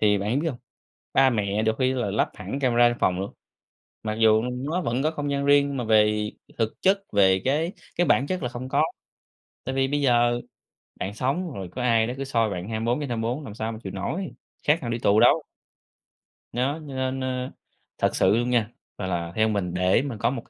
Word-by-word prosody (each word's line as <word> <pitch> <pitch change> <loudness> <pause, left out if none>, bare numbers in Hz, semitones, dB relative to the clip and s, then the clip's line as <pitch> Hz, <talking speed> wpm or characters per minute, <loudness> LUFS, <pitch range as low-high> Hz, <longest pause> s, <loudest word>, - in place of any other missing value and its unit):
thì 105 -1 +4
bạn 105 +7 0
biết 165 - 0
hông, 125 - -5 0.6
ba 135 0 +5
mẹ 105 -3 0
được 110 0 +1
khi 130 0 +2
là 120 -6 -1
lắp 105 - +1
hẳn 140 - -5
camera 120 -3 +4
trong 120 - -4
phòng 90 0 +2
luôn. 95 - -4 0.7
Mặc 110 -1 -2
dù, 110 -1 +4
ừ, - - -2
nó 140 +8 -2
vẫn 125 -3 -1
có 155 - +2
không 145 -2 -3
gian 140 0 -1
riêng 140 0 +5
nhưng 140 -1 -4
mà 125 - -2
về 105 -1 +3 0.3
thực 110 -1 0
chất, 195 +1 +4
về 95 -2 +4
cái 155 +7 +1 0.2
cái 175 - +2
bản 135 - +3
chất 185 -2 -2
là 125 - -1
không 125 +1 -7
có, - - +3 0.8
tại 130 - -3
vì 135 0 +2
bây 145 +1 0
giờ 120 -2 +3 0.6
bạn 95 +2 -3
sống 145 - -1
rồi 95 -6 -6
có 125 - -5
ai 115 -2 +3
đó 120 - -3
cứ 135 - -3
soi 115 -5 +1
bạn 95 +1 -5
24/24 120 +3 -1
làm 110 - -8
sao 110 +1 -3
mà 110 - -7
chịu 95 - -6
nổi, 130 - -3 0.4
khác 150 +2 +4
nào 120 - -4
đi 115 - -2
tù 105 -1 +4
đâu. - - +5 1.1
Nó, 130 +4 0
cho 140 - -7
nên, 130 0 -2
ơ, 130 0 -3 0.5
thật - - +1
sự 95 +3 +4
luôn 120 +1 0
nha. 115 -3 +2 0.3
Mà 95 - -3
là 85 -2 -2
theo 110 0 +3
mình, 100 -5 -1
để 90 +4 +3
mà 135 -5 -4
có - - +2
một 130 -1 -3
120 Hz, 225 wpm, -25 LUFS, 105-135 Hz, 1.1 s, ba